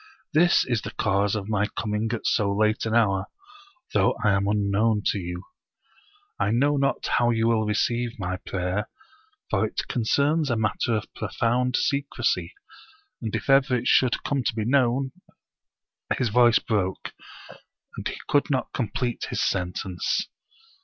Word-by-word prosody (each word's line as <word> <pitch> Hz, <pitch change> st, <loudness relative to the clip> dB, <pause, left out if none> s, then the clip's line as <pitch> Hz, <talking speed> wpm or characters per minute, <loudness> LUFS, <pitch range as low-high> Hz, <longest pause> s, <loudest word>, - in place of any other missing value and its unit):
This 175 Hz, +3 st, +4 dB
is 120 Hz, -4 st, 0 dB
the -, -, -6 dB
cause 100 Hz, 0 st, +1 dB
of 105 Hz, -2 st, -4 dB
my 105 Hz, -1 st, +1 dB
coming 105 Hz, 0 st, -1 dB
at 115 Hz, -, -4 dB
so 100 Hz, -3 st, +2 dB
late 110 Hz, +2 st, +1 dB
an 110 Hz, -, 0 dB
hour, 100 Hz, -5 st, +2 dB, 0.7 s
though -, -, +3 dB
I 105 Hz, -, +4 dB
am 100 Hz, 0 st, +1 dB
unknown 105 Hz, +1 st, +1 dB
to 100 Hz, -, +1 dB
you. 90 Hz, 0 st, -6 dB, 1.0 s
I -, -, +1 dB
know 140 Hz, +6 st, +2 dB
not 140 Hz, -1 st, 0 dB
how 120 Hz, -1 st, +2 dB
you 115 Hz, -1 st, +1 dB
will 110 Hz, -2 st, +2 dB
receive 115 Hz, +3 st, 0 dB
my 90 Hz, -2 st, -3 dB
prayer, 95 Hz, +3 st, -3 dB, 0.6 s
for 100 Hz, 0 st, +2 dB
it 110 Hz, -, -3 dB
concerns 140 Hz, +6 st, +1 dB
a 120 Hz, -, +1 dB
matter 110 Hz, +1 st, 0 dB
of 105 Hz, -, -5 dB
profound 125 Hz, +2 st, 0 dB
secrecy, 140 Hz, -, -1 dB, 0.7 s
and 115 Hz, -2 st, -3 dB
if 115 Hz, -, -4 dB
ever 135 Hz, -1 st, +4 dB
it 120 Hz, -, -5 dB
should 130 Hz, -2 st, +3 dB
come 140 Hz, -2 st, -1 dB
to 120 Hz, -, 0 dB
be 110 Hz, -2 st, -2 dB
known 130 Hz, +1 st, +2 dB, 0.5 s
" -, -, -8 dB
His 125 Hz, -, 0 dB
voice 120 Hz, +1 st, +5 dB
broke, 95 Hz, -5 st, -2 dB, 0.8 s
and -, -, -4 dB
he -, -, -5 dB
could 145 Hz, -, +2 dB
not 135 Hz, -3 st, -1 dB
complete 120 Hz, 0 st, -2 dB
his -, -, -1 dB
sentence. 90 Hz, 0 st, -1 dB
110 Hz, 160 wpm, -25 LUFS, 105-125 Hz, 1.0 s, voice